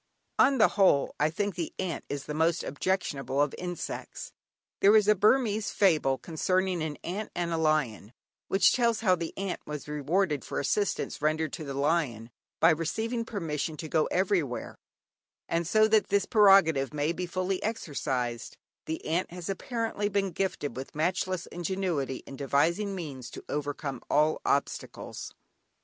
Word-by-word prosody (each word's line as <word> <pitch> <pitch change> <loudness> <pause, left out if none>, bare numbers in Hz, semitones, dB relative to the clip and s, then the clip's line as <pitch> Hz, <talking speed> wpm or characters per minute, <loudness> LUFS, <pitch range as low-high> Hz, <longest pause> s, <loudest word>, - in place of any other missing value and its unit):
On 275 - +5
the 215 - +6
whole, 190 -9 +3
I 150 - +3
think 200 +5 -2
the 170 -2 -4
ant 185 -3 -3
is 140 -1 -3
the 150 - -4
most 160 +3 +1
objectionable 145 -4 -2
of 145 -1 +2
insects. 175 -1 -6 0.5
There 205 +2 +6
is 210 -2 +5
a 210 - +7
Burmese 210 0 +2
fable 155 -9 +3
concerning 185 +3 0
an 155 -2 -3
ant 200 +5 -4
and 170 -1 -1
a - - 0
lion 150 -10 0 0.4
which 195 -1 +4
tells 235 -3 +2
how 190 -5 +4
the 170 -2 -2
ant 195 -1 -3
was 150 -1 -6
rewarded 150 +1 0
for - - -3
assistance 200 +6 -1
rendered 155 0 0
to 160 - -5
the 140 -2 -5
lion, 140 -6 0 0.3
by - - +6
receiving 225 +9 -1
permission 160 -7 -3
to 160 - -6
go 155 0 +2
everywhere, 180 -9 0 0.7
and 170 0 -1
so 215 +3 +5
that 220 -1 +4
this 200 -1 +2
prerogative 180 - +5
may 150 +2 +1
be 180 +1 -4
fully 185 +2 -2
exercised, 135 - -3 0.3
the 160 - -4
ant 170 +4 0
has, 175 +1 -7
apparently, 220 +1 -2
been 195 -2 0
gifted 165 -7 -2
with 130 +3 -7
matchless 180 +2 -1
ingenuity 175 -7 -2
in 135 - -9
devising 165 +9 +1
means 140 -8 -6
to - - -10
overcome 145 -1 -3
all 155 +1 +3
obstacles. 140 - -2
170 Hz, 160 wpm, -29 LUFS, 150-195 Hz, 0.7 s, a